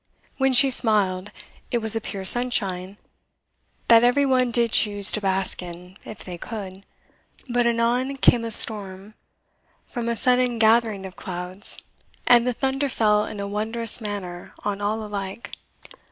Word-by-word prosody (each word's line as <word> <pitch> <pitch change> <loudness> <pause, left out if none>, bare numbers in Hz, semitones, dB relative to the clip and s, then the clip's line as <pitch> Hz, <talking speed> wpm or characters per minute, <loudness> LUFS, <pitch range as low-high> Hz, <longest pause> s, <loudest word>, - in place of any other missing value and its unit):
When 265 0 +2
she 265 +2 +5
smiled, 205 -5 +1 0.4
it 240 - 0
was 220 -1 +1
a 225 - -2
pure 195 -1 -6
sunshine, 195 -5 +1 0.9
that 230 0 +6
every 245 +4 +3
one 255 -2 +1
did 235 -1 +2
choose 205 -2 +4
to 215 - -1
bask 190 -1 -2
in, 180 +1 -11
if 215 - -10
they 175 -2 -9
could; 195 -3 -9 0.6
but 245 -1 0
anon 240 +3 0
came 245 -3 +3
a 230 - -4
storm 205 -2 +1 0.7
from 235 -1 -5
a 235 - -1
sudden 250 +1 +1
gathering 220 -3 +2
of 185 -1 -10
clouds, 180 +2 -6 0.5
and 245 0 +4
the 250 - 0
thunder 270 +3 -2
fell 210 -3 +1
in 205 - -8
a 200 - -4
wondrous 220 +3 0
manner 190 -4 -7
on 205 -1 -3
all 215 +2 -2
alike." 200 +1 -7
215 Hz, 155 wpm, -23 LUFS, 195-240 Hz, 0.9 s, that